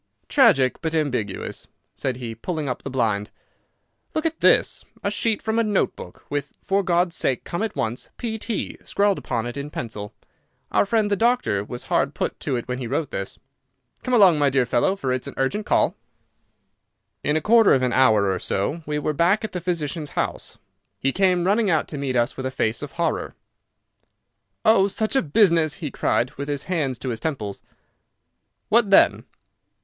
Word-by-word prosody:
"Tragic, 200 Hz, -, +4 dB
but 160 Hz, -1 st, -1 dB
ambiguous," 125 Hz, -11 st, -2 dB, 0.3 s
said 130 Hz, -2 st, -3 dB
he, 120 Hz, -3 st, -5 dB
pulling 155 Hz, +6 st, -4 dB
up 125 Hz, -, -3 dB
the -, -, -6 dB
blind. 110 Hz, -5 st, 0 dB, 0.9 s
"Look 315 Hz, -, -1 dB
at 325 Hz, 0 st, -1 dB
this—a -, -, +2 dB
sheet 225 Hz, -3 st, 0 dB
from 220 Hz, +1 st, 0 dB
a -, -, +3 dB
note 210 Hz, -3 st, 0 dB
book, -, -, -11 dB
with 145 Hz, -1 st, -4 dB
'For 195 Hz, +1 st, +1 dB
God's 175 Hz, -2 st, +1 dB
sake 130 Hz, -6 st, 0 dB
come 170 Hz, -, -4 dB
at 220 Hz, -2 st, -2 dB
once—P.T.,' 210 Hz, -, -4 dB
scrawled 200 Hz, -1 st, +1 dB
upon 115 Hz, -3 st, -2 dB
it 120 Hz, +2 st, -5 dB
in 140 Hz, +1 st, -5 dB
pencil. 105 Hz, -7 st, -6 dB, 0.6 s
Our -, -, +3 dB
friend, 215 Hz, -1 st, +1 dB
the -, -, +4 dB
doctor, 230 Hz, -, +1 dB
was 120 Hz, +4 st, -7 dB
hard 140 Hz, +1 st, 0 dB
put -, -, -3 dB
to 140 Hz, -, -2 dB
it 120 Hz, -, -4 dB
when 125 Hz, 0 st, -3 dB
he 125 Hz, -, -4 dB
wrote 145 Hz, +3 st, -2 dB
this. 95 Hz, 0 st, -4 dB, 0.6 s
Come 255 Hz, -, 0 dB
along, 185 Hz, -8 st, +6 dB
my 145 Hz, -1 st, +4 dB
dear 135 Hz, -2 st, +2 dB
fellow, 120 Hz, +11 st, +1 dB
for 130 Hz, -9 st, -2 dB
it's 130 Hz, -, -3 dB
an -, -, -8 dB
urgent 200 Hz, +11 st, -1 dB
call." -, -, +3 dB, 1.3 s
In 150 Hz, +1 st, +1 dB
a -, -, +2 dB
quarter 225 Hz, +5 st, +5 dB
of 130 Hz, -, +4 dB
an 125 Hz, -, +1 dB
hour 110 Hz, -7 st, +4 dB
or 95 Hz, -, -2 dB
so 140 Hz, -, -2 dB
we 150 Hz, 0 st, -1 dB
were 150 Hz, +1 st, -1 dB
back 180 Hz, +8 st, +2 dB
at 220 Hz, -, -4 dB
the 180 Hz, -, -4 dB
physician's 165 Hz, -3 st, -2 dB
house. -, -, -2 dB, 0.4 s
He 135 Hz, -, 0 dB
came 180 Hz, +1 st, +2 dB
running 205 Hz, +2 st, +2 dB
out 160 Hz, -3 st, +1 dB
to 150 Hz, -, -5 dB
meet 135 Hz, -2 st, -2 dB
us 120 Hz, +1 st, +1 dB
with 130 Hz, 0 st, -3 dB
a -, -, -2 dB
face 115 Hz, -3 st, -1 dB
of 145 Hz, -, -7 dB
horror. 170 Hz, -1 st, -2 dB, 1.3 s
"Oh, 215 Hz, -3 st, +5 dB
such 215 Hz, +5 st, -1 dB
a 270 Hz, -, +4 dB
business!" 165 Hz, -2 st, +3 dB
he 150 Hz, -6 st, -5 dB
cried, 125 Hz, +1 st, 0 dB
with 140 Hz, +1 st, -5 dB
his 145 Hz, -2 st, -2 dB
hands 150 Hz, -9 st, -1 dB
to 130 Hz, -, -5 dB
his 115 Hz, -2 st, -3 dB
temples. 110 Hz, -11 st, -4 dB, 1.1 s
"What 220 Hz, -2 st, +4 dB
then?" 195 Hz, -, +5 dB
150 Hz, 185 wpm, -23 LUFS, 130-195 Hz, 1.3 s, along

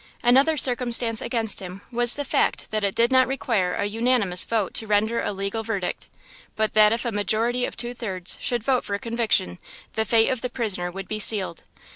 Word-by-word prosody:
Another 270 Hz, +6 st, +3 dB
circumstance 240 Hz, -3 st, +4 dB
against 225 Hz, -4 st, -1 dB
him 185 Hz, +1 st, -9 dB
was 240 Hz, 0 st, +4 dB
the 285 Hz, -, -4 dB
fact -, -, -1 dB
that 215 Hz, -1 st, -2 dB
it 200 Hz, -1 st, -1 dB
did 235 Hz, +2 st, +2 dB
not 260 Hz, 0 st, +4 dB
require 225 Hz, -9 st, -1 dB
an 200 Hz, -, -2 dB
unanimous 225 Hz, -4 st, +1 dB
vote 220 Hz, -5 st, -2 dB
to 220 Hz, -, -2 dB
render 215 Hz, +3 st, 0 dB
a -, -, -3 dB
legal 200 Hz, +3 st, -4 dB
verdict, 205 Hz, -5 st, -4 dB, 0.5 s
but 215 Hz, 0 st, -1 dB
that 215 Hz, -1 st, +5 dB
if 230 Hz, +2 st, -2 dB
a 235 Hz, -, -2 dB
majority 225 Hz, +4 st, 0 dB
of -, -, -8 dB
two 240 Hz, 0 st, -1 dB
thirds 190 Hz, -7 st, -2 dB
should 240 Hz, -3 st, -1 dB
vote 255 Hz, 0 st, 0 dB
for 200 Hz, -, -3 dB
conviction, 225 Hz, -, 0 dB, 0.3 s
the 220 Hz, -, 0 dB
fate 225 Hz, 0 st, +3 dB
of 255 Hz, -3 st, -3 dB
the 250 Hz, -, -3 dB
prisoner 205 Hz, -8 st, -2 dB
would 190 Hz, +1 st, -8 dB
be 215 Hz, +1 st, -4 dB
sealed. 200 Hz, -5 st, +1 dB
225 Hz, 200 wpm, -23 LUFS, 200-240 Hz, 0.5 s, that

